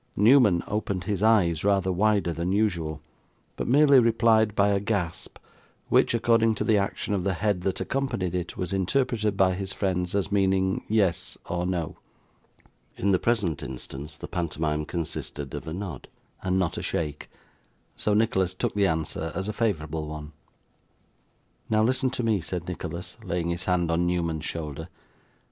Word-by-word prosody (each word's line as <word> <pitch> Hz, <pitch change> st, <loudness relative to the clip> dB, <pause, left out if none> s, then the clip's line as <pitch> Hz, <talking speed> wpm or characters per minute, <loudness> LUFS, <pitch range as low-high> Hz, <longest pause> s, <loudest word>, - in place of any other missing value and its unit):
Newman 105 Hz, -5 st, +5 dB
opened 100 Hz, -3 st, -2 dB
his 100 Hz, -2 st, -2 dB
eyes 95 Hz, -8 st, +3 dB
rather 95 Hz, -2 st, +2 dB
wider 100 Hz, -2 st, +2 dB
than 85 Hz, +3 st, -2 dB
usual, 85 Hz, -7 st, 0 dB, 0.5 s
but -, -, -3 dB
merely 140 Hz, +1 st, +6 dB
replied 115 Hz, -2 st, +3 dB
by 100 Hz, 0 st, +4 dB
a 100 Hz, -1 st, +2 dB
gasp, 100 Hz, -5 st, -3 dB, 0.5 s
which, -, -, +4 dB
according 115 Hz, -1 st, +3 dB
to -, -, -2 dB
the 110 Hz, -, +3 dB
action 100 Hz, +1 st, -1 dB
of 95 Hz, -3 st, 0 dB
the 95 Hz, -1 st, 0 dB
head 100 Hz, 0 st, 0 dB
that 95 Hz, +1 st, -1 dB
accompanied 130 Hz, -10 st, -2 dB
it, 90 Hz, -1 st, -3 dB
was 90 Hz, 0 st, -3 dB
interpreted 110 Hz, +1 st, 0 dB
by 95 Hz, -1 st, +4 dB
his 95 Hz, +1 st, -4 dB
friends 90 Hz, -2 st, -1 dB
as 100 Hz, 0 st, 0 dB
meaning 95 Hz, -1 st, +2 dB
yes 100 Hz, -5 st, +1 dB
or 90 Hz, 0 st, -2 dB
no. 85 Hz, -4 st, -2 dB, 1.0 s
In 100 Hz, -, +1 dB
the 95 Hz, -, +3 dB
present 105 Hz, -10 st, 0 dB
instance, 70 Hz, +4 st, -7 dB
the -, -, -7 dB
pantomime 75 Hz, -3 st, -2 dB
consisted 75 Hz, -4 st, -5 dB
of -, -, -6 dB
a -, -, -4 dB
nod, 90 Hz, -7 st, -6 dB, 0.3 s
and 95 Hz, 0 st, 0 dB
not 95 Hz, -3 st, 0 dB
a -, -, -5 dB
shake; 75 Hz, -3 st, -3 dB, 0.7 s
so 105 Hz, -, 0 dB
Nicholas 95 Hz, -4 st, +1 dB
took -, -, -1 dB
the 100 Hz, -1 st, +3 dB
answer 80 Hz, 0 st, -2 dB
as 95 Hz, -, -3 dB
a 105 Hz, -, -2 dB
favourable 80 Hz, -9 st, -1 dB
one. 75 Hz, -1 st, -7 dB, 1.4 s
'Now 110 Hz, 0 st, +3 dB
listen 130 Hz, +3 st, +2 dB
to 125 Hz, -, -3 dB
me,' 110 Hz, -4 st, +2 dB
said 90 Hz, 0 st, -5 dB
Nicholas, 90 Hz, +1 st, -6 dB
laying 85 Hz, -2 st, -2 dB
his 85 Hz, +1 st, -3 dB
hand 90 Hz, -2 st, +1 dB
on 85 Hz, +1 st, +1 dB
Newman's 85 Hz, -3 st, -1 dB
shoulder. 80 Hz, 0 st, -5 dB
95 Hz, 165 wpm, -26 LUFS, 85-105 Hz, 1.4 s, merely